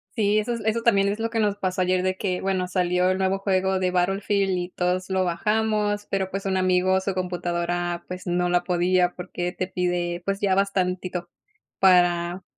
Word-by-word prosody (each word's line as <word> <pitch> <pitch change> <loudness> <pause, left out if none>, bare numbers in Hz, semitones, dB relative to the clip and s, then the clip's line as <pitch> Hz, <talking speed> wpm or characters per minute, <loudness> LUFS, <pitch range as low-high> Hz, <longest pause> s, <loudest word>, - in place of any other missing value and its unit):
Sí, 210 -2 +2
esos 230 +2 -3
eso 225 +1 +1
también, 200 -4 +3
es 205 +2 -2
lo 225 0 -1
que 225 -1 -1
nos 205 -2 +1
pasó 185 -2 -2
ayer 185 0 +2
de 185 0 -1
que, 185 -3 -2
bueno, 185 -1 -1
salió 180 0 +1
el 185 - +1
nuevo 190 0 0
juego 190 -1 +1
de 185 -1 0
Battlefield, 195 +1 +1
y 175 0 -3
todos 180 0 -1
lo 190 -1 +1
bajamos. 210 +3 0
Pero, 190 -1 -1
pues, 195 +1 -4
un 190 -1 0
amigo, 185 0 +2
su 190 0 -2
computadora, 175 -1 -2
pues, 180 +1 -7
no 180 0 0
la 175 0 +2
podía 180 0 +1
porque 180 -1 -4
te 185 0 -4
pide, 175 -1 -1
pues, 195 0 0
ya 195 -2 +1
bastantito, 185 -2 -1 0.5
para 175 -1 +3
185 Hz, 190 wpm, -24 LUFS, 180-195 Hz, 0.5 s, también